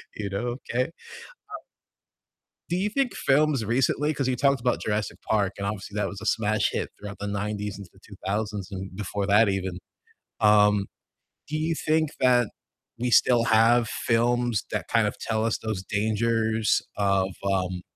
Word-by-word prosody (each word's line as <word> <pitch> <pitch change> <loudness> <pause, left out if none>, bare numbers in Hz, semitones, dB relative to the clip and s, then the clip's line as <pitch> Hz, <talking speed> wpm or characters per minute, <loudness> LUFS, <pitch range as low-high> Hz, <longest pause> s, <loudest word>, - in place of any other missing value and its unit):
You 105 -2 -4
know? 120 +5 -2
Okay. 125 +2 +1
Um 170 - -15 1.6
do 175 - 0
you 200 +3 0
think 270 +1 0
films 140 -3 +2
recently 135 +6 +1
'cause 135 -3 -1
you 130 - +1
talked 140 0 +2
about 125 0 0
Jurassic 105 0 -2
Park 100 -3 0
and 100 - -4
obviously 100 0 -5
that 105 - 0
was 100 -1 -7
a - - -7
smash 110 -1 +1
hit - - -2
throughout 105 -1 -8
the 100 - -4
'90s 105 0 -3
into 100 -3 -10
the 95 - -21
2000s 100 0 -4
and 95 -1 -6
before 100 0 -3
that 105 +1 +5
even. 95 -2 -2 0.6
Um, 105 -1 +5 0.6
do 155 - -2
you 160 +1 0
think 155 -1 +1
that 125 -3 +4 0.5
we 125 +1 -1
still 120 -1 +5
have 115 +1 +4
films 120 -1 +1
that - - -3
kind - - +3
of - - -7
tell 110 -1 -1
us 115 - 0
those 110 -4 -4
dangers 110 +2 +1
of, 100 -2 +1 0.2
um, 90 -2 -1
110 Hz, 165 wpm, -26 LUFS, 100-120 Hz, 1.6 s, that